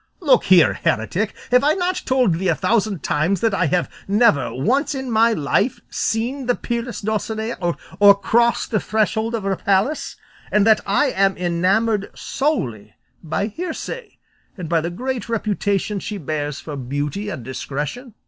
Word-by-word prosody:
"Look 275 - +3
here, 180 -4 +6
heretic, 185 - -1 0.2
have 250 +1 +5
I 300 +2 +3
not 365 0 -1
told 255 -8 +3
thee 185 +4 -1
a 165 - +3
thousand 200 -1 0
times 165 +6 +1
that 225 -2 +2
I 185 -3 +1
have 175 +4 +1 0.2
never 205 -6 +3
once 275 - 0
in 265 -2 -4
my 225 +1 +4
life 200 - 0
seen 245 +4 -2
the 245 - +3
peerless 235 0 -4
Dulcinea 220 +2 -2
or 185 +3 +3
crossed 235 +4 +1
the 215 - +2
threshold 220 +2 0
of 220 - -4
her 195 0 0
palace, 200 +10 0 0.4
and 210 -1 +3
that 220 -1 +5
I 230 +8 +2
am 195 0 +2
enamoured 195 +5 +1
solely 120 - -2 0.3
by 170 +5 -2
hearsay 360 - -6 0.4
and 180 -3 -5
by 165 0 +2
the 170 - -3
great 250 +6 -4
reputation 205 -2 -1
she 210 +2 -5
bears 150 -3 -3
for 150 - -7
beauty 145 +9 -3
and 125 - -6
discretion?" 150 - -5
205 Hz, 160 wpm, -21 LUFS, 175-235 Hz, 0.4 s, here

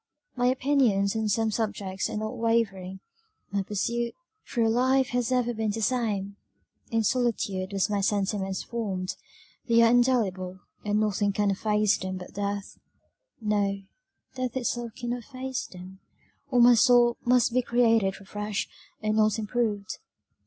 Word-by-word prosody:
"My 245 -1 +1
opinions 250 -7 +2
on 220 -1 0
some 220 +2 +1
subjects 200 -3 -2
are - - -4
not 215 +1 -3
wavering; 195 -5 -1 0.5
my 200 0 0
pursuit 235 +4 -2 0.3
through 230 -2 +1
life 260 +3 +2
has 245 0 -1
ever 245 -1 +1
been 220 -1 -1
the 220 +2 -2
same: 205 -5 -1 0.5
in 225 -1 +1
solitude 205 -5 0
were 200 - -3
my 205 -2 -1
sentiments 195 -1 -1
formed; 195 -6 -3 0.5
they 230 -1 +5
are 230 - +5
indelible, 200 -7 +1 0.2
and 210 0 +1
nothing 205 -1 +1
can 205 0 +1
efface 210 +1 +1
them 185 0 -4
but 180 - -10
death 200 0 -4 0.6
No, 200 -2 0 0.5
death 255 -1 -3
itself 240 -2 -2
cannot 245 0 -3
efface 260 -1 -5
them, 185 +1 -12 0.5
or 250 -3 +2
my 240 +1 +8
soul 240 0 +5
must 245 -1 +3
be 255 - +3
created 230 -5 +2
afresh, 205 +1 -4 0.4
and 215 0 +1
not 215 0 +3
improved. 215 -2 -2
215 Hz, 145 wpm, -27 LUFS, 200-240 Hz, 0.6 s, my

